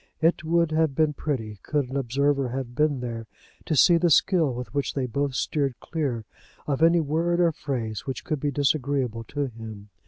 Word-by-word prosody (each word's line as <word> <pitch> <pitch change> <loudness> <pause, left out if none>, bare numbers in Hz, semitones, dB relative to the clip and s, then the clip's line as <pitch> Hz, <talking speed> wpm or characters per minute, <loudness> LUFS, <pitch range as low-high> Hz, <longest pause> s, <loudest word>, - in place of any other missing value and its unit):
It 165 0 +2
would 170 0 +2
have 155 -3 +1
been 155 0 +2
pretty, 115 -9 -3
could 145 -4 -1
an - - -5
observer 140 +1 +1
have 125 -1 -4
been 145 -1 +1
there, 115 -2 -5 0.4
to 155 - 0
see 170 +5 +6
the 170 +1 +2
skill 165 -2 +4
with 125 +1 -6
which 140 -2 -1
they 135 -2 0
both 140 +2 -1
steered 140 -4 -1
clear 135 -9 -3 0.4
of 140 0 -1
any 170 +1 +5
word 165 +3 0
or 170 -1 +4
phrase 125 -8 -4
which 135 0 -4
could 155 - -2
be 145 - 0
disagreeable 135 -4 0
to 145 +3 -2
him. 110 -4 -9
140 Hz, 190 wpm, -25 LUFS, 125-155 Hz, 0.4 s, see